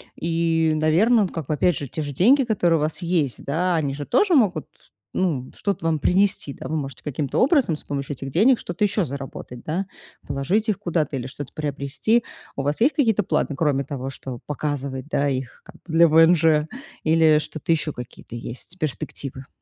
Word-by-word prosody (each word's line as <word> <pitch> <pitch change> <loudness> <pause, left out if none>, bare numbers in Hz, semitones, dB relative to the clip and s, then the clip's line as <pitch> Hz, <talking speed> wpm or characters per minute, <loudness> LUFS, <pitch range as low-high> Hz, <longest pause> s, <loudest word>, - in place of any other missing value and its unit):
И, 165 -1 +1
наверно, 200 +9 +4
ну, - - 0
как 160 -5 -6
бы 155 - 0
опять 175 +3 +2
же 140 - -5
те 155 - -4
же 145 -1 -5
деньги, 255 - +5
которые 180 -8 +2
у - - -2
вас 155 +3 -2
есть, 165 -7 -1
да, 175 +5 +1
они 140 -4 -1
же 145 0 -5
тоже 370 - +3
могут, 190 - +3 0.5
ну, 150 -9 -1
что-то 200 -5 -2
вам 160 -2 +1
принести, 185 -4 +1
да. - - -8
Вы 160 - -1
можете 140 -2 -6
каким-то 145 -1 -3
образом 265 - +3
с - - -12
помощью 140 0 -4
этих 135 +1 -7
денег 230 - +4
что-то 175 +4 -1
ещё 205 0 +1
заработать, 135 -3 -7
да. 180 +5 -2 0.4
Положить 160 - 0
их 205 - 0
куда-то 155 -5 -1
или 125 - -5
что-то 140 +1 -8
приобрести. 150 - 0 0.3
У 140 - -2
вас 145 +2 -1
есть 280 +6 +4
какие-то 225 -8 +2
планы, 145 - 0
кроме 140 -3 +1
того, 135 -2 -5
чтобы 130 -2 -7
показывать, 140 -2 -3
да, 145 -2 +1
их 130 -2 -4
как - - -15
бы 160 - -7
для 170 +1 +7
ВНЖ, 160 -1 +5 0.4
или 160 -1 +5
что-то 155 +1 -4
еще 155 -1 -1
какие-то 125 -1 -9
есть 125 +10 -8
перспективы? 135 -2 -5
155 Hz, 195 wpm, -23 LUFS, 140-180 Hz, 0.5 s, для